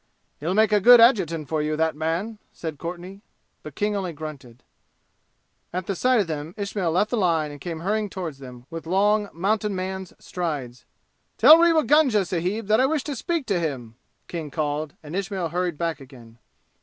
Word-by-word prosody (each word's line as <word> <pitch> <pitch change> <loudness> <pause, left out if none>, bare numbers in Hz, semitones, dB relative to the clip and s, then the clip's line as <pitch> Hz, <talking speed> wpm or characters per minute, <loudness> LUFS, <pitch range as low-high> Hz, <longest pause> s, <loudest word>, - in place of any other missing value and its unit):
"He'll 170 +6 -2
make 220 0 +4
a 210 - +4
good 245 +3 +9
adjutant 175 - +3
for 155 +1 -1
you, 155 0 -1
that 160 0 +1
man," 170 +8 -3
said 160 -4 -7
Courtenay; 180 +3 -7 0.4
but - - -10
King 210 0 0
only 185 -4 -3
grunted. 140 -6 -9 1.1
At 185 +2 -3
sight 255 +5 +3
of - - -1
them 155 +1 -5
Ismail 200 -4 -2
left 205 +6 +1
the 245 - 0
line 165 -6 +1
and 145 -1 -11
came 165 0 -5
hurrying 210 +3 -1
toward 180 -5 -5
them 125 -2 -12
with 165 0 -7
long 205 +3 +2
mountainman's 190 0 -2
strides. 145 -9 -5 0.5
"Tell 305 +8 +9
Rewa 335 -2 +4
Gunga 270 -10 +3
sahib 185 +5 -2
that 215 +2 +3
I 265 - +4
wish 300 -2 -1
to 290 - -4
speak 330 +3 -2
to 195 -6 0
him!" 130 -9 -4 0.3
King 165 -4 -5
called, 150 0 -3
and 155 +3 -7
Ismail 195 -3 -2
hurried 175 -1 -2
back 165 -1 -2
again. 120 -4 -15
180 Hz, 180 wpm, -24 LUFS, 155-210 Hz, 1.1 s, good